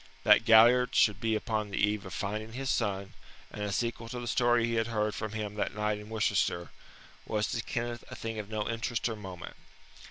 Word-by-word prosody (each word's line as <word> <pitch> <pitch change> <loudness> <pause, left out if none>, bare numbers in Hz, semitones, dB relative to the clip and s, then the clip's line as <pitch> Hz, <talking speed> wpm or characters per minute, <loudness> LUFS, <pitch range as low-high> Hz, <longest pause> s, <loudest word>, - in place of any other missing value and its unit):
That - - +6
Galliard 120 +3 +6
should 105 -2 +4
be 115 -1 +1
upon 110 -1 -2
the 100 - -4
eve 105 -1 +1
of 95 - -8
finding 110 +2 -4
his 135 +1 -2
son, 100 -3 -1 0.4
and 105 - -7
a 105 -1 -2
sequel 115 +2 -2
to 125 - -5
the 120 - -6
story 120 0 +3
he 115 - -2
had 115 0 +1
heard 105 -2 -1
from 110 -1 -5
him 105 -2 -4
that 105 - -2
night 105 0 -1
in 105 +1 -11
Worcester, 105 -6 0 0.6
was 105 0 0
to 115 - -1
Kenneth 120 +1 -4
a - - -8
thing 115 -1 -5
of 105 -1 -6
no 110 -1 -2
interest 115 +1 -1
or 115 - -3
moment. 95 -4 -9
110 Hz, 215 wpm, -30 LUFS, 105-115 Hz, 0.6 s, That